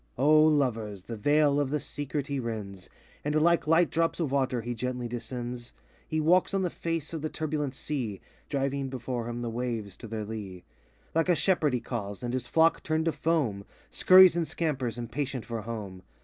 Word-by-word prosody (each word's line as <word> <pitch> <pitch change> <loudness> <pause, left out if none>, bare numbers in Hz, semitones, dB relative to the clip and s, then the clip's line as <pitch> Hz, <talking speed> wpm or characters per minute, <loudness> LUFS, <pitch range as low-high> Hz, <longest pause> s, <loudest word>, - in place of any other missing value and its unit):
O 150 +4 +6
Lovers, 115 -10 +1
the 115 - -6
Veil 145 +5 +3
of 145 -2 0
the 150 +2 0
Secret 145 0 -4
he 140 -1 -2
rends, 105 -6 -5 0.3
And 150 +1 -1
like 170 0 +3
light 165 +2 +4
drops 165 +1 +1
of 155 -6 -1
water, 130 -3 +1
he 120 +2 -3
gently 125 +1 -3
descends. 120 0 -5 0.3
He 155 - -1
walks 180 +5 +3
on 195 - +1
the 180 - -1
face 165 -2 -3
of 160 - -3
the 155 - -2
turbulent 150 -4 -2
sea, 125 -9 -3 0.3
Driving 135 -1 -1
before 125 -2 -4
him 120 0 -4
the 120 - -2
waves 115 -5 -3
to - - -9
their 110 -1 -4
lee; 100 -5 -7 0.5
Like 165 +2 +1
a 175 - +5
shepherd 165 -6 +2
he 120 - -2
calls, 105 -3 -5
and 120 0 -2
his 125 -1 -2
flock 165 0 +3
turned 160 0 0
to 165 - +2
foam. 145 -13 0 0.3
Scurries 185 -2 +8
and 170 -2 0
scampers, 135 -8 -2
impatient 125 +1 -3
for 115 -2 -4
home. 105 -5 -6
130 Hz, 190 wpm, -28 LUFS, 115-155 Hz, 0.5 s, Scurries